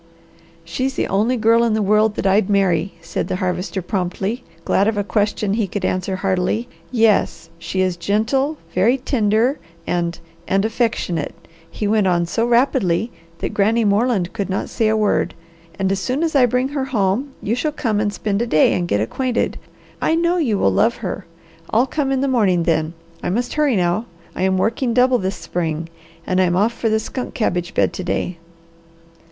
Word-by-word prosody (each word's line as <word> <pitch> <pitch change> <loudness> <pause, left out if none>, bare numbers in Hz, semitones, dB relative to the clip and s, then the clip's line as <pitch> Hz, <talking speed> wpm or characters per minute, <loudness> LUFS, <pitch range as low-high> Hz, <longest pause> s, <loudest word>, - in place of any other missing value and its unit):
"She's 265 +1 -2
the - - 0
only 220 +6 +1
girl 230 +1 +4
in 230 -2 +2
the 220 - +1
world 210 +1 +3
that - - -3
I'd 195 +1 +3
marry," 195 -3 +1
said 165 - -3
the - - -2
Harvester 180 +1 -2
promptly, 195 +6 -2 0.2
glad 200 - +2
of 220 -1 0
a 205 - +1
question 205 0 0
he 215 -2 0
could 190 0 -3
answer 185 +1 -1
heartily. 190 +4 0 0.2
"Yes. 225 -4 +1
She 170 +3 -2
is 185 -2 0
gentle, 245 - 0 0.2
very 220 +8 +3
tender 235 0 +1 0.3
and 170 -1 -1 0.3
and 195 +2 +2
affectionate," 220 - -1 0.3
he 210 - -3
went 210 -2 +2
on 175 -1 +2
so 230 +7 0
rapidly 235 -4 +2 0.3
that - - -4
Granny 220 +3 +2
Moreland 205 -3 +1
could 200 -3 -3
not 190 - -2
say 225 - 0
a 220 0 +2
word, 215 -1 +1 0.4
"and 195 -1 0
as 195 - 0
soon 255 - -1
as 325 - 0
I 255 -3 +6
bring 250 +3 0
her 280 -2 -2
home 240 +2 0
you 215 - -2
shall 275 +6 0
come 225 -8 -1
to 210 0 +1
spend 205 +1 -2
a 240 - 0
day 155 -9 +4
and 175 -1 -1
get 105 -10 +1
acquainted. 250 - -1 0.4
I 320 - +2
know 340 +2 +2
you 245 - +1
will 95 - +2
love 230 - +3
her! 185 0 -4 0.4
I'll 230 +4 +3
come 270 0 -1
in 265 -1 +1
the 275 - +1
morning, 200 -9 +2
then. 160 0 0 0.3
I - - -2
must 240 +6 -1
hurry 300 -5 +2
now. 180 +4 +1 0.3
I - - -4
am 190 0 +2
working 230 +4 0
double 250 0 +4
this 190 +1 -2
spring 165 -1 -3 0.4
and 185 0 +1
I'm 175 -1 +2
off 210 +5 +2
for 230 - -1
the 220 - +2
skunk 250 +3 -5
cabbage 180 -6 -1
bed - - +2
to 185 - -5
day." 175 -1 -2
210 Hz, 190 wpm, -20 LUFS, 185-240 Hz, 0.4 s, I